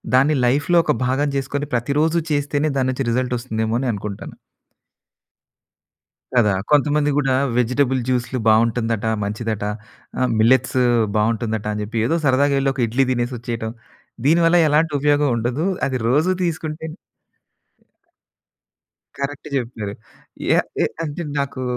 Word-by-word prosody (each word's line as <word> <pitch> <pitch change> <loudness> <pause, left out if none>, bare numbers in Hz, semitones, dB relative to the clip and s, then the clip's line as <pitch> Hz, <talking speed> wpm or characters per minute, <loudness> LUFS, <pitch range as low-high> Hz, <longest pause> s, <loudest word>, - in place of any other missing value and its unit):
దాన్ని 145 +4 +4
లైఫ్‍లో 145 +7 +2
ఒక - - +2
భాగం 135 +3 +1
జెసుకొని 140 +2 -3
ప్రతిరోజు 150 +7 +1
చేస్తేనే 145 +1 0
దాని 130 -1 +1
నుంచి 130 0 -3
రిజల్ట్ 125 +1 0
ఒస్తుందేమో 110 -2 -2
అని 130 - -2
అనుకుంటాను. 100 0 -6 2.0
కదా! 105 -5 +4 0.2
కొంతమంది 150 0 +3
గూడా 135 -3 +2 0.2
"వెజిటబుల్ 130 +2 +1
జ్యూస్‌లు 125 0 -1
బావుంటుందట. 115 0 +2 0.2
మంచిదట. 105 0 -3 0.5
ఆహ్, 130 - +2
మిల్లెట్స్ 130 +3 +3 0.4
బావుంటుందట" 110 0 0
అని 105 - -3
జెప్పి 110 +2 -4
ఏదో 165 - +1
సరదాగా 140 +1 +3
ఎళ్లి 135 0 +1
ఒక 130 - -4
ఇడ్లీ 130 +4 +1
తినేసొచ్చేయటం. 120 -2 -3 0.5
దీనివల్ల 165 +2 +4
ఎలాంటి 150 +1 +2
ఉపయోగం 145 0 +3
ఉండదు. 120 +8 -1 0.2
అది 130 -1 -1
రోజు 155 +8 +3
తీసుకుంటేనే 160 -1 -4 2.2
కరెక్ట్ 140 +1 -4
జెప్పారు. 115 -5 -3 0.6
ఏ - - +4 0.3
ఏ - - +3 0.2
అంటే 155 +3 -5 0.2
నాకూ 140 -2 -3
130 Hz, 120 wpm, -20 LUFS, 115-145 Hz, 2.2 s, దాన్ని